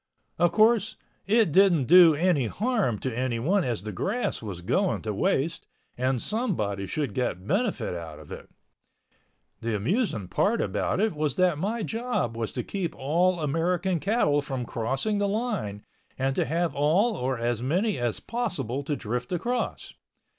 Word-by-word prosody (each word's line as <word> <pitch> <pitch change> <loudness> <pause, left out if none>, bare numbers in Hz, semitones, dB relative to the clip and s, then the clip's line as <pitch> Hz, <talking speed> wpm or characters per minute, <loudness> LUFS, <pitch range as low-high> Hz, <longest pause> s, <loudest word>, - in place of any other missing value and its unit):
Of 175 -1 +4
course, 220 +1 +3 0.3
it 215 -4 +3
didn't 185 -4 +5
do 170 +2 +7
any 155 -6 +2
harm 210 - 0
to 130 -3 -3
anyone 130 - +1
as 115 - -2
the 105 - -5
grass 205 - -2
was 100 -6 -6
going 185 - 0
to 110 -1 -2
waste 150 +10 0 0.3
and 130 0 0
somebody 110 - -2
should 145 +8 -2
get 110 -8 -2
benefit 220 - 0
out 80 -3 -7
of - - -13
it. - - -9 1.1
The 115 -1 -1
amusing 115 - -1
part 215 - +1
about - - -1
it 220 0 +2
was 150 -1 -1
that 180 -5 +2
my 215 +5 -1
job 225 - -2
was 115 -1 -3
to - - -3
keep 190 -5 -3
all 170 +5 +1
American 170 +4 0
cattle 155 -7 +2
from 135 -3 -4
crossing 135 - -1
the 205 - +1
line 200 - -2 0.3
and 135 +1 0
to - - +1
have 165 +4 0
all 180 +11 +2
or 130 -4 -1
as 120 0 -1
many 185 - 0
as 120 -3 -1
possible 175 - -3
to 145 - -1
drift 120 0 -4
across. 240 +8 -2
155 Hz, 160 wpm, -26 LUFS, 120-200 Hz, 1.1 s, do